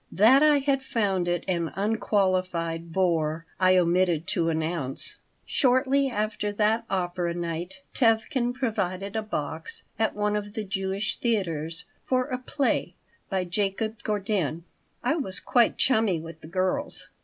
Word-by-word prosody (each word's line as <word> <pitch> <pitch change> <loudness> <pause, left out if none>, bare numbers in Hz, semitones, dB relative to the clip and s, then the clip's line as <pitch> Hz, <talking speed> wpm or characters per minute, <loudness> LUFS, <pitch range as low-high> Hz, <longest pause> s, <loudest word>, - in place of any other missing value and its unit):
That 230 +8 +6
I 300 -1 +6
had 275 -1 +1
found 200 -8 0
it 175 -1 0
an 170 -3 -1
unqualified 185 -5 0
bore 165 -3 +1
I 185 0 +5
omitted 175 -2 +2
to 165 -2 +1
announce. 160 -4 -1 0.3
Shortly 270 +1 +3
after 210 -2 -2
that 220 +2 +2
opera 175 -2 -1
night 175 +2 -4
Tevkin 240 +1 +2
provided 200 -5 -2
a 220 - +1
box 160 -6 -4 0.2
at 220 - +1
one 210 0 0
of 205 0 -3
the 220 - -3
Jewish 195 +1 -2
theaters 165 -8 -1 0.2
for 255 -1 +1
a 255 -2 -2
play 270 +2 -1 0.3
by 190 -2 0
Jacob 205 +4 -2
Gordin 195 -6 -1 0.4
I 310 - +1
was 190 - -2
quite 240 -2 +3
chummy 220 -9 +3
with 165 0 -10
the - - -10
girls. 185 - -2
195 Hz, 140 wpm, -26 LUFS, 170-225 Hz, 0.4 s, That